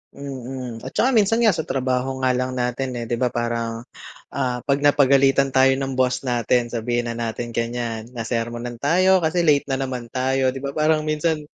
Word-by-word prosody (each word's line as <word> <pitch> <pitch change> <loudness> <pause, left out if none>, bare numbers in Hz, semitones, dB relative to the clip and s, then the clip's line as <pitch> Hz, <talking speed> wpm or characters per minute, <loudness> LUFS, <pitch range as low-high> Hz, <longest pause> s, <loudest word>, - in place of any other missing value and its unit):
Mm. 130 -4 -7
At - - -6
tsaka 260 +1 +2
minsan 220 +1 +3
nga 220 -6 +4
sa 160 - -2
trabaho 130 -1 -1
nga 130 -1 +2
lang 125 +1 -1
natin, 125 +1 -2
eh, 115 - -5
'di 120 - -1
ba 125 0 0
parang, 115 -1 -2 0.6
ah, 125 -3 -1
'pag 140 0 +1
napagalitan 140 -1 +4
tayo 130 0 +6
ng 135 -1 -3
boss 130 +1 0
natin 120 0 +1
sabihin 120 +1 -2
na 115 - -3
natin 115 0 -4
ganyan, 115 -1 -3
nasermonan 120 0 -4
tayo 180 +8 +3
kasi 160 +3 +1
late 150 -4 +3
na 135 - 0
naman 125 -3 -4
tayo, 130 0 +1
'di 135 - -7
ba 140 +1 -5
parang 155 0 +2
minsan 155 +1 0
130 Hz, 185 wpm, -22 LUFS, 120-140 Hz, 0.6 s, tayo